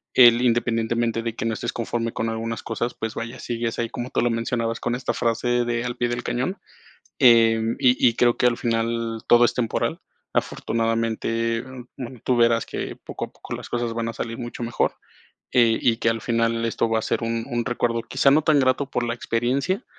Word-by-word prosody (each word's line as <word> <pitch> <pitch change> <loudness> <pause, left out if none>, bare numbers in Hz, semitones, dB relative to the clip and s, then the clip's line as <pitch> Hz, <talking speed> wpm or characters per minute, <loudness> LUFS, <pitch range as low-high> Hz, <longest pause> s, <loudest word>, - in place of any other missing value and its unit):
el 120 -1 +7
independientemente 115 -1 +1
de 115 -1 -3
que - - -4
no 115 - 0
estés 120 +2 -3
conforme 115 0 -2
con 115 - -2
algunas 115 0 -4
cosas, 120 +1 -3
pues 110 0 -4
vaya, 115 +2 -5
sigues 115 -1 -3
ahí, 115 -1 -1
como 120 +2 -5
tú - - 0
lo 120 - +2
mencionabas, 115 0 -1
con 120 0 -1
esta 125 +1 -2
frase 120 +1 0
de: 120 0 -1
"Al 120 - -4
pie 120 0 0
del 120 0 -3
cañón". 130 +11 -2 0.6
Em, 115 -2 +5
y 125 -1 +5
y 115 - -5
creo 120 0 +3
que - - +1
al 120 - +1
final 115 -1 -1
todo 120 0 +6
es 120 - +1
temporal. 120 -3 -1 0.3
Afortunadamente, 115 0 -1 0.3
bueno, 125 -1 -7
tú 125 -2 +1
verás 115 -1 +3
que - - -5
poco - - -5
a - - -19
poco - - -8
las - - -8
cosas 120 -1 -2
van 115 0 -2
a - - -5
salir 115 0 -5
mucho 120 0 -7
mejor, 120 0 0 0.6
eh, 115 -2 +4
y 115 -1 +2
que - - +1
al 115 -1 -1
final 115 -1 0
esto 115 0 0
va 115 0 +1
a - - -9
ser - - -1
un 115 0 -1
un 120 -2 -1
recuerdo, 120 -1 0
quizá, 120 +4 +2
no 150 +3 +5
tan 150 -1 +4
grato 130 +1 +1
por 125 - -1
la 115 - -1
experiencia, 130 - -1
115 Hz, 210 wpm, -23 LUFS, 115-120 Hz, 0.6 s, el